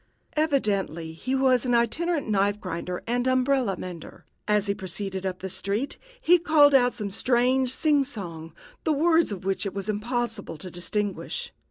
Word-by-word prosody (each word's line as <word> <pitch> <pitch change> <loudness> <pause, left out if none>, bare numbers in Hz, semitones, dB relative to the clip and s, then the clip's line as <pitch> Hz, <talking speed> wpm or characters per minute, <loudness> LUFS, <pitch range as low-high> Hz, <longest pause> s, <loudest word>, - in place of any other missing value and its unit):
Evidently 200 - 0
he 255 +11 -2
was 260 -2 +3
an 245 -2 +2
itinerant 300 +7 +1
knife 205 0 +1
grinder 180 -1 -4
and 245 +2 0
umbrella 255 -5 +2
mender. 175 -3 -9 0.2
As 210 -1 +2
he 200 - 0
proceeded 190 0 -4
up 185 -1 -5
the 190 - -3
street, 200 +7 -2 0.2
he 355 -7 +5
called 310 -4 +5
out 250 -2 +5
some 210 -4 -4
strange 250 +4 +2
sing 290 +1 +2
song, 170 - -7 0.3
the 315 - +2
words 325 -1 +3
of 190 -2 -6
which 195 0 0
it 200 -2 -4
was 195 +1 -3
impossible 225 -3 -2
to 180 +4 -8
distinguish. 210 - -3
220 Hz, 165 wpm, -26 LUFS, 195-265 Hz, 0.3 s, he